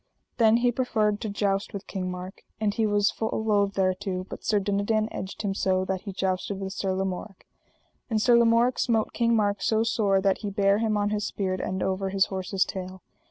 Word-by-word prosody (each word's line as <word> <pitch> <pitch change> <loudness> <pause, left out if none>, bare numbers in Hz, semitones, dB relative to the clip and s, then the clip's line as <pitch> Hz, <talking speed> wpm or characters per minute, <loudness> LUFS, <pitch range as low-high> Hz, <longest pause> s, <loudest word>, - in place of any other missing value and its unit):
Then 225 -1 +5
he 245 0 +2
proffered 215 -4 0
to 220 - -3
joust 200 0 -1
with 200 - -6
King 185 -2 -4
Mark. 180 +1 -7 0.2
And 210 -2 +1
he 220 0 +1
was 205 -1 +2
full 220 0 -2
loath 200 -2 +2
thereto, 185 0 -1
but - - -9
Sir 210 -2 +2
Dinadan 205 +2 0
edged 190 +3 -6
him 200 -2 0
so, 185 -1 +1
that 190 -1 -2
he 205 - -6
jousted 190 +1 -2
with 190 -1 -4
Sir 190 -1 -1
Lamorak. 190 +1 -4 0.6
And 220 -2 +1
Sir 240 +2 +5
Lamorak 235 +1 +4
smote 225 -3 +1
King 235 0 +2
Mark 205 -2 +1
so 220 0 +2
sore 205 -4 +2
that 190 0 +1
he 205 - -4
bare 200 0 +2
him 220 -2 +1
on 205 0 0
his 210 -1 -1
spear 190 -2 -2
end 190 0 -2
over 190 0 -1
his 195 0 +3
horse's 190 0 0
tail. 185 -1 -7
200 Hz, 205 wpm, -26 LUFS, 190-220 Hz, 0.6 s, Then